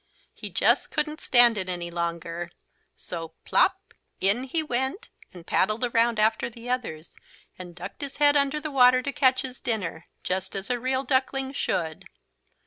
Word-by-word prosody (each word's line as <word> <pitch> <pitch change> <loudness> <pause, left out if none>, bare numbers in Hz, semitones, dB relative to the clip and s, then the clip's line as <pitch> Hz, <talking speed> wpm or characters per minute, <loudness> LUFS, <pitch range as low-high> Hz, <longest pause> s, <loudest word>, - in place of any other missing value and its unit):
He - - -7
just - - +2
couldn't 305 0 -2
stand 240 -3 +5
it 185 -1 -3
any 175 -1 -4
longer. 170 0 -3 0.5
So 165 -2 -7
plopp - - +1 0.3
in 205 +7 +1
he 315 +5 -1
went 265 - -2 0.2
and 175 -2 -13
paddled 215 +6 +1
around 235 -1 +2
after 220 +2 +2
the 235 +1 -12
others, 175 -11 -4 0.4
and 175 -2 -9
ducked 175 +9 -8
his 280 -2 -4
head 290 0 +5
under 280 +1 +2
the 305 0 -5
water 255 -1 +5
to 280 - -2
catch 255 -1 +3
his 255 -1 -7
dinner, 190 -8 -3 0.2
just 190 +1 -3
as 195 +5 -3
a 245 - 0
real 260 +2 0
duckling 265 0 0
should. 160 - -2
235 Hz, 165 wpm, -26 LUFS, 180-265 Hz, 0.5 s, stand